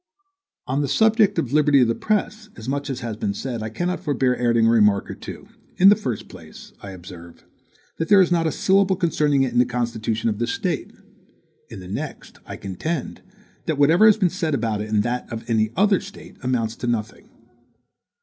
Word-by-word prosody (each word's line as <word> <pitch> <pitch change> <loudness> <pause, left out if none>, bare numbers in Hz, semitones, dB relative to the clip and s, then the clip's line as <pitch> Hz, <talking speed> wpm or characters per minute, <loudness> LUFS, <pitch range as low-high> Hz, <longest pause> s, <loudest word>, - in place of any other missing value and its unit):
On 135 +3 -1
the 145 - -1
subject 220 - +3
of 125 - -1
the - - -8
liberty 150 -2 +4
of 125 - +4
the 115 - +1
press, 215 - -2
as 110 - -10
much 140 +2 -3
as 130 -2 -4
has 115 -2 -4
been 100 -2 -2
said, 120 0 -4
I 110 - -4
cannot 175 +11 -2
forbear 135 -7 0
adding 115 -2 +2
a - - +4
remark 105 -3 +3
or - - -5
two: - - -10 0.3
in 190 +2 +7
the 205 - +7
first 125 - -5
place, - - -13
I 100 - -8
observe, 85 -2 -12 0.5
that 165 - -2
there 205 -1 +7
is 180 -2 +4
not 165 -2 +2
a - - 0
syllable 195 +2 +2
concerning 150 -6 +1
it 125 -3 -2
in 120 - +2
the - - +6
constitution 115 -2 -2
of 105 -2 -1
this 120 0 -1
State; - - -3 0.8
in - - -9
the 90 - -10
next, 95 - -7
I - - -6
contend, 100 - -5 0.5
that 160 -3 -1
whatever 160 +9 +5
has 215 - +6
been 185 -5 +1
said 165 -6 -1
about 110 -5 -2
it 105 - -6
in 105 -1 +2
that 120 +3 -3
of 115 0 -7
any 110 -2 +1
other 200 +1 +3
State, 200 +1 -12
amounts 120 -4 -1
to 120 - -5
nothing. 115 -2 -3
125 Hz, 210 wpm, -22 LUFS, 115-170 Hz, 0.8 s, in